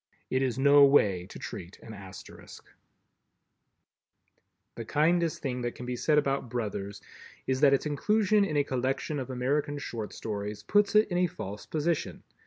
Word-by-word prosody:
It 130 Hz, -, +1 dB
is 130 Hz, -3 st, -1 dB
no 140 Hz, +1 st, +6 dB
way 100 Hz, -10 st, +4 dB
to -, -, -10 dB
treat 90 Hz, +2 st, -8 dB
an 110 Hz, -, -10 dB
Asterisk. 95 Hz, -2 st, -12 dB, 2.1 s
The 115 Hz, -, -6 dB
kindest 160 Hz, +6 st, +1 dB
thing 125 Hz, -3 st, -2 dB
that 120 Hz, 0 st, -3 dB
can 125 Hz, -, -8 dB
be 125 Hz, 0 st, -3 dB
said 150 Hz, +5 st, +1 dB
of 140 Hz, -4 st, 0 dB
"Brothers" 100 Hz, -4 st, -4 dB, 0.4 s
is 130 Hz, +1 st, -1 dB
that 140 Hz, -2 st, +6 dB
its 135 Hz, -, -3 dB
inclusion 210 Hz, +7 st, +2 dB
in 155 Hz, -7 st, -1 dB
a 145 Hz, -, +3 dB
collection 135 Hz, +2 st, -2 dB
of 130 Hz, -, -5 dB
American 140 Hz, +3 st, -1 dB
Short 115 Hz, -6 st, -5 dB
Stories 105 Hz, -1 st, -5 dB
puts 205 Hz, -, +2 dB
it 215 Hz, +1 st, +6 dB
in 175 Hz, -1 st, 0 dB
a 180 Hz, -, +3 dB
false 105 Hz, -, -8 dB
position. 160 Hz, +1 st, -2 dB
135 Hz, 165 wpm, -28 LUFS, 115-150 Hz, 2.1 s, no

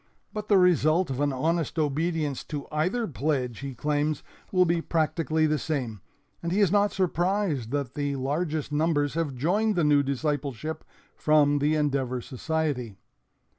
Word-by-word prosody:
But 210 Hz, -1 st, -5 dB
the 205 Hz, -, +5 dB
result 175 Hz, -2 st, +3 dB
of 130 Hz, -, -3 dB
an 145 Hz, -1 st, +2 dB
honest 160 Hz, +4 st, -1 dB
obedience 155 Hz, -1 st, 0 dB
to 145 Hz, -2 st, -5 dB
either 180 Hz, +10 st, 0 dB
pledge, 130 Hz, -, -2 dB
he 135 Hz, -2 st, -6 dB
claims, 150 Hz, +3 st, -1 dB, 0.3 s
will 185 Hz, -1 st, +4 dB
be 170 Hz, 0 st, +1 dB
practically 160 Hz, -1 st, +1 dB
the 155 Hz, -1 st, +1 dB
same, 125 Hz, -, -3 dB, 0.4 s
and 170 Hz, -, -3 dB
he 195 Hz, -, +1 dB
is 200 Hz, -5 st, +4 dB
not 205 Hz, 0 st, +3 dB
surprised 180 Hz, -, 0 dB
that 140 Hz, 0 st, -2 dB
the 145 Hz, -1 st, -2 dB
largest 150 Hz, +3 st, -2 dB
numbers 150 Hz, -1 st, +1 dB
have 160 Hz, -5 st, -2 dB
joined 200 Hz, -, +1 dB
the 170 Hz, -, +2 dB
new 145 Hz, -1 st, +5 dB
discipleship 145 Hz, +1 st, -2 dB, 0.3 s
from 145 Hz, -1 st, +3 dB
the 150 Hz, +2 st, +2 dB
Endeavor 135 Hz, -4 st, 0 dB
Society. 130 Hz, -4 st, -3 dB
150 Hz, 155 wpm, -27 LUFS, 140-170 Hz, 0.4 s, the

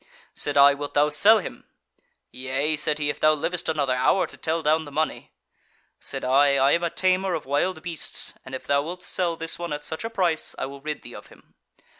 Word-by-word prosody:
Said 145 Hz, -1 st, 0 dB
I, 140 Hz, 0 st, +8 dB
'Wilt 145 Hz, 0 st, -7 dB
thou 145 Hz, +1 st, +4 dB
sell 200 Hz, +10 st, +5 dB
him?' 195 Hz, -, -7 dB, 0.7 s
'Yea' 135 Hz, +4 st, -1 dB
said 150 Hz, 0 st, +1 dB
he, 150 Hz, -1 st, 0 dB
'if -, -, -11 dB
thou 155 Hz, 0 st, +5 dB
livest 165 Hz, +3 st, -2 dB
another 145 Hz, -5 st, 0 dB
hour 130 Hz, +9 st, +2 dB
to -, -, -11 dB
tell 160 Hz, 0 st, -2 dB
down 155 Hz, +1 st, +2 dB
the 145 Hz, -, -10 dB
money.' 155 Hz, +2 st, -3 dB, 0.7 s
Said -, -, -4 dB
I, 140 Hz, +2 st, +4 dB
'I 135 Hz, +1 st, +3 dB
am 170 Hz, -, +2 dB
a 170 Hz, -, +1 dB
tamer 185 Hz, +1 st, +1 dB
of 160 Hz, -, -5 dB
wild 160 Hz, +5 st, -1 dB
beasts, 170 Hz, -3 st, -3 dB
and 130 Hz, -, -7 dB
if 130 Hz, -, -8 dB
thou 140 Hz, 0 st, +2 dB
wilt 180 Hz, +4 st, -7 dB
sell 175 Hz, -2 st, 0 dB
this 165 Hz, +1 st, -3 dB
one 170 Hz, -2 st, -5 dB
at 150 Hz, 0 st, -5 dB
such 160 Hz, +5 st, -4 dB
a 225 Hz, -, -3 dB
price, 180 Hz, -8 st, -1 dB
I -, -, -3 dB
will 140 Hz, +1 st, -9 dB
rid 150 Hz, +1 st, -5 dB
thee -, -, -10 dB
of -, -, -11 dB
him.' -, -, -21 dB
155 Hz, 225 wpm, -24 LUFS, 140-170 Hz, 0.7 s, I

